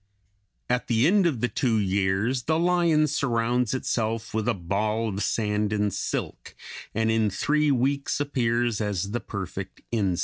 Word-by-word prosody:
At 125 0 0
the 115 0 +3
end 190 +2 +4
of 130 -9 -2
the 120 - +2
two 115 +1 0
years 100 +5 0
the 160 0 +2
lion 170 -3 +3
surrounds 125 -4 0
itself 115 -3 -2
with 110 0 -1
a 120 - +2
ball 105 +5 -1
of 100 0 -4
sand 105 -1 0
and 105 -2 0
silk, 95 - -4 0.4
and 110 0 +2
in 110 -1 +2
three 150 +9 +1
weeks 140 +2 +1
appears 120 -5 0
as 100 -2 -2
the 120 - -1
perfect 100 -3 -6
insect. 100 -6 0
115 Hz, 160 wpm, -26 LUFS, 105-130 Hz, 0.4 s, end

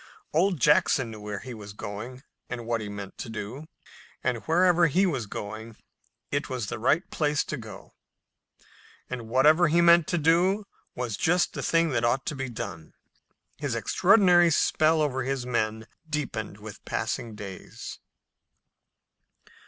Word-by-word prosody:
Old 175 +1 +2
Jack 150 +3 +5
knew 115 -5 -5
where 105 -1 -5
he 130 - -7
was 105 -2 -9
going 110 +6 -7 0.3
and 120 -2 -5
what 115 -1 -1
he 105 - -5
meant 100 -1 -8
to - - -5
do. 115 +7 -6 0.6
And 125 -2 0
wherever 175 +1 +4
he 185 +6 +3
was 135 - -1
going 110 +3 -7 0.5
it 145 +1 -1
was 125 -4 -3
the 105 - -5
right 150 - +2
place 150 -1 +1
to - - -4
go 110 -6 -10 0.7
to, - - -28 0.5
and 120 -3 -5
whatever 155 +8 +5
he 165 +3 +3
meant 170 -1 +6
to 175 - 0
do 175 +6 +3 0.3
was 120 -4 -3
just 175 +2 +2
the - - -4
thing 165 0 +2
that 120 -5 0
ought 120 +3 +1
to 150 - -3
be 135 -1 -4
done. 100 -9 -7 0.6
His - - -2
extraordinary 180 -3 +5
spell 155 0 +3
over 130 -3 -1
his 130 -1 -2
men 110 -2 -1 0.2
deepened 120 -9 -3
with 105 -1 -9
the - - -16
passing 115 -3 -3
days. 100 -3 -8
130 Hz, 160 wpm, -27 LUFS, 110-160 Hz, 0.7 s, meant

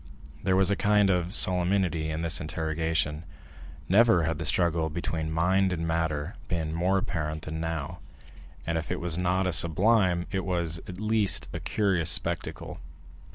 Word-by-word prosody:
There 95 0 0
was 95 +1 +4
a - - +2
kind 105 -1 +2
of 90 -1 -1
solemnity 90 -5 +2
in 80 +1 -4
this 85 +2 +5
interrogation. 80 -1 -2 0.6
Never 100 -2 +4
had 80 -1 -3
the 80 - -4
struggle 85 -1 +1
between 80 -1 -4
mind 95 +4 +1
and 85 -2 -3
matter 80 +2 -3
been 80 -4 -3
more 90 +4 0
apparent 80 -5 -4
than 80 +1 -6
now, 80 -3 -5 0.7
and 85 0 -2
if 80 - -8
it - - -3
was 85 0 -3
not 90 +1 0
a 90 - -1
sublime, 90 +2 +3
it 95 -1 -2
was, 85 -3 -2
at 90 0 -9
least, 110 -1 +2
a - - -5
curious 95 -6 0
spectacle. - - +1
85 Hz, 160 wpm, -26 LUFS, 80-95 Hz, 0.7 s, this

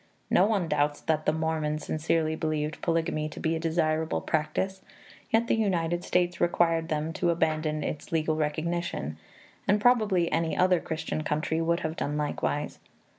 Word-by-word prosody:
No 190 - +5
one 200 -6 +1
doubts 145 -1 +1
that 155 -1 0
the - - +5
Mormons 155 -1 -1
sincerely 160 0 0
believed 155 -1 -2
polygamy 165 -2 0
to 150 - -9
be 160 0 0
a - - -2
desirable 160 -1 0
practice, 160 +5 -1 0.5
yet 225 +1 +3
the - - +1
United 175 -5 0
States 175 -1 0
required 165 -1 +2
them 155 +1 -1
to 175 +2 0
abandon 155 -2 0
its 150 - -5
legal 155 -1 +1
recognition, 155 - -2 0.5
and 205 +2 +4
probably 210 -7 +3
any 165 -1 0
other 180 -1 +4
Christian 160 -1 -3
country 155 +1 -1
would 170 +1 +1
have 160 0 -3
done 145 +1 -2
likewise. 150 0 -2
160 Hz, 160 wpm, -28 LUFS, 155-175 Hz, 0.5 s, No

